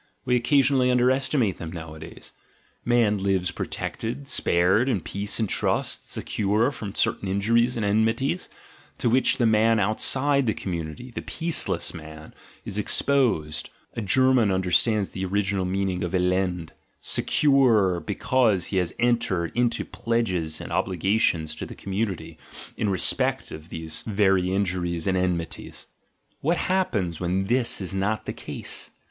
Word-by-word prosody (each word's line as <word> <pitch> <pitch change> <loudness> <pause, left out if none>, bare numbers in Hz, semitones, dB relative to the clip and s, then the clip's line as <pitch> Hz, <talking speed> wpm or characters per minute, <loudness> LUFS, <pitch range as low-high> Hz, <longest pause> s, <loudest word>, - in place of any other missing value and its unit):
we 125 - +2
occasion 135 +2 +3
ally 125 -1 +3
underestimate 125 -3 +2
them 80 -1 -6
nowadays), 80 -1 -9 0.5
man 115 -4 +2
lives 95 -2 +1
protected, 125 +5 -5
spared, 95 +1 +2
in 115 -7 +1
peace 100 +4 -3
and 110 - +1
trust, - - -1
secure 105 +6 0
from 105 -7 -7
certain 100 - 0
injuries 115 +6 +2
and 110 - -1
enmities, 115 - 0 0.5
to - - -1
which 130 +2 +3
the 120 - +2
man 110 0 +4
outside 130 +6 +2
the 110 - +1
community, 85 +6 -5
the - - -5
"peaceless" 165 0 -1
man, 80 -1 -10 0.3
is 100 - -3
exposed, 105 - 0
— - - -38
a 115 - -3
German 130 +2 +3
understands 95 +3 +1
the 95 - -5
original 95 0 0
meaning 95 -1 -1
of 90 - -3
"Elend" 90 -1 +2
{elend), 90 -3 -1 0.2
— - - -44
secure 115 -11 +3
because 105 +2 +1
he 95 - -3
has 90 -2 -1
entered 115 -9 +1
into 120 -1 0
pledges 95 -10 -1
and - - -8
obligations 90 -4 +1
to - - -7
the - - -8
com 100 - -7
munity 95 -6 -3 0.4
in 105 - -1
respect 95 -2 0
of 75 +2 -9
these 80 -1 -4
very 95 -3 +2
injuries 90 -3 -1
and 95 - +1
enmities. 90 -2 -3 0.5
What 170 +4 +1
happens 105 - 0
when 90 +2 -1
this 120 +3 +1
is 95 -1 -3
not 100 +3 -1
the - - -4
case? - - -5
100 Hz, 150 wpm, -25 LUFS, 90-120 Hz, 0.5 s, man